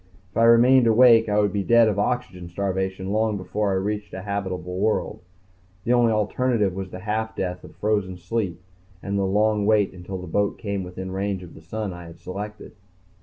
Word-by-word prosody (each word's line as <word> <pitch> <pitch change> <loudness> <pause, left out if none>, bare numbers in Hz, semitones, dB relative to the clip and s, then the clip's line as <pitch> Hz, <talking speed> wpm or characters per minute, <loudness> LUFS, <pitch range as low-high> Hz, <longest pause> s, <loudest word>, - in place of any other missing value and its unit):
If - - -8
I 115 - +5
remained 120 +2 +6
awake 115 -1 +6
I 105 0 +2
would 105 -2 +1
be 100 - 0
dead 115 +3 +5
of 105 -2 0
oxygen 95 -6 -2
starvation 95 +1 -2
long 110 0 +1
before 100 +2 -2
I 95 - +1
reached 105 +2 -3
a 95 - -6
habitable 95 -3 -4
world. 110 +2 0 0.6
The 120 - +2
only 120 -2 +4
alternative 110 -1 +1
was 95 0 -5
the 90 - -8
half 110 +2 -2
death 90 -2 -3
of - - -13
frozen 105 -4 -1
sleep 90 -1 -3 0.4
and 100 0 -3
the 100 -1 +1
long 105 +1 +2
wait 105 -3 +3
until 90 +1 -7
the 90 - -7
boat 100 +4 0
came 100 -2 -3
within 95 +1 -7
range 95 0 -2
of 85 - -12
the - - -13
sun 100 +4 -4
I 90 0 -9
had 85 - -12
selected. 105 +3 -7
100 Hz, 200 wpm, -24 LUFS, 95-110 Hz, 0.6 s, remained